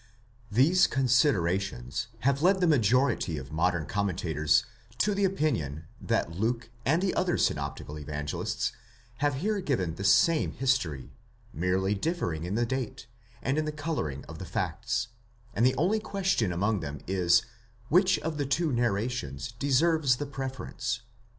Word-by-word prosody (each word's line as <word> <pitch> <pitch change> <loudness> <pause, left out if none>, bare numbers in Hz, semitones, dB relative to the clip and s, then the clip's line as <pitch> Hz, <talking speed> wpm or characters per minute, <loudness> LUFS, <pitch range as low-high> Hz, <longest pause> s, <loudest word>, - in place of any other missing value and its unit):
These 140 - +5
considerations 100 - +1
have 140 +1 +2
led 190 +3 +4
the 180 - +3
majority 125 - +2
of 70 0 -8
modern 85 0 +1
commentators 80 -7 +1 0.3
to 210 - +2
the 200 0 +2
opinion, 115 - -1 0.2
that - - 0
Luke 115 +6 -2 0.2
and 160 +6 +3
the 190 - +1
other 185 -1 +1
synoptical 75 +1 -2
Evangelists 75 0 -3 0.5
have 145 0 +1
here 205 +8 -1
given 105 - -1
the 95 - -6
same 155 +11 +4
history, 90 - -1 0.4
merely 95 +4 +1
differing 100 - -2
in 95 +4 -2
the 120 +1 +2
date, 130 -2 -4 0.4
and 135 +3 +1
in 155 - 0
the 155 - -2
colouring 145 - -3
of - - -10
the - - -6
facts 115 +1 -2 0.2
;* 120 0 -30
and 115 - +1
the 130 +1 +4
only 190 +10 +2
question 190 - 0
among 100 +4 0
them 75 -2 -6
is, 85 -2 +3 0.5
which 185 +3 +4
of 160 -1 -3
the 145 - 0
two 155 +3 +1
narrations 115 - -1
deserves 140 +3 +2
the 145 - -4
preference. 130 -3 -4
120 Hz, 150 wpm, -28 LUFS, -, 0.5 s, These